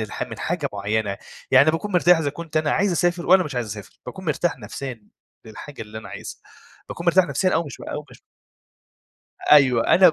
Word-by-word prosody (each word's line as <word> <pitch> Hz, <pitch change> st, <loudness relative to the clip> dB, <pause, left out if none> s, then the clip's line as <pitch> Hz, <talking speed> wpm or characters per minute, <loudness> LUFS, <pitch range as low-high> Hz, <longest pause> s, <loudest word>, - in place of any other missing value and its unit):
الح 110 Hz, -1 st, -4 dB
من -, -, -6 dB
حاجة 160 Hz, -4 st, -2 dB
معيّنة، 100 Hz, 0 st, -2 dB, 0.3 s
يعني 135 Hz, +4 st, +6 dB
باكون 180 Hz, +6 st, -4 dB
مرتاح 180 Hz, -1 st, +5 dB
إذا 145 Hz, -3 st, -1 dB
كنت 160 Hz, +1 st, -8 dB
أنا 155 Hz, -1 st, +2 dB
عايز 200 Hz, -2 st, +1 dB
أسافر 175 Hz, 0 st, 0 dB
والّا 185 Hz, +1 st, +5 dB
مش 145 Hz, -4 st, -6 dB
عايز 120 Hz, -2 st, -2 dB
أسافر، 105 Hz, -1 st, -9 dB
باكون 190 Hz, -, -8 dB
مرتاح 160 Hz, 0 st, -1 dB
نفسيًا 115 Hz, +1 st, -7 dB, 0.4 s
للحاجة 115 Hz, +4 st, -9 dB
اللي 110 Hz, 0 st, -9 dB
أنا 110 Hz, -, -10 dB
عايزها، -, -, -9 dB, 0.5 s
باكون 170 Hz, -, -7 dB
مرتاح 180 Hz, +2 st, +5 dB
نفسيًا 185 Hz, +1 st, 0 dB
أو 170 Hz, -, +1 dB
مش 140 Hz, -5 st, -10 dB
و -, -, -8 dB
أو -, -, -5 dB
مش -, -, -16 dB, 1.3 s
أيوه 130 Hz, -5 st, +5 dB
أنا 180 Hz, -2 st, +7 dB
150 Hz, 195 wpm, -23 LUFS, 115-175 Hz, 1.3 s, أنا